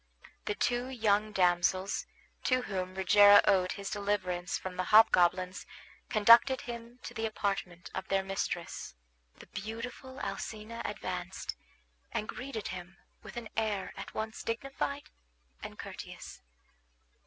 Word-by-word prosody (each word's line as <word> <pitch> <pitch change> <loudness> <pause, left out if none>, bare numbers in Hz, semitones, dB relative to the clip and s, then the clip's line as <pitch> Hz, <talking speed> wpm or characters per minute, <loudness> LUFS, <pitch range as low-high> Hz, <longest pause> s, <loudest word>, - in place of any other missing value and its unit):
The 210 -1 -1
two 245 +3 0
young 215 -4 +1
damsels 185 0 +2 0.4
to 255 -1 +3
whom 185 -3 -3
Rogero 205 +2 +8
owed 185 -1 +3
his 200 -1 -6
deliverance 195 -3 -1
from 185 -1 -6
the 185 0 -1
hobgoblins 185 -3 +4 0.4
conducted 230 +5 +6
him 235 0 -8
to - - -7
the 225 0 -1
apartment 195 -5 -3
of 190 - -4
their 195 0 +1
mistress. 190 - -4 0.4
The - - -12
beautiful 230 +5 -7
Alcina 215 +3 -5
advanced, - - -4 0.6
and 220 -2 -2
greeted 250 -5 -5
him 180 0 -8 0.2
with - - -10
an 235 -2 -5
air 210 -4 -1
at - - -8
once 220 +1 -4
dignified 275 +4 -3 0.5
and - - -8
courteous. - - -9
205 Hz, 125 wpm, -31 LUFS, 190-230 Hz, 0.6 s, Rogero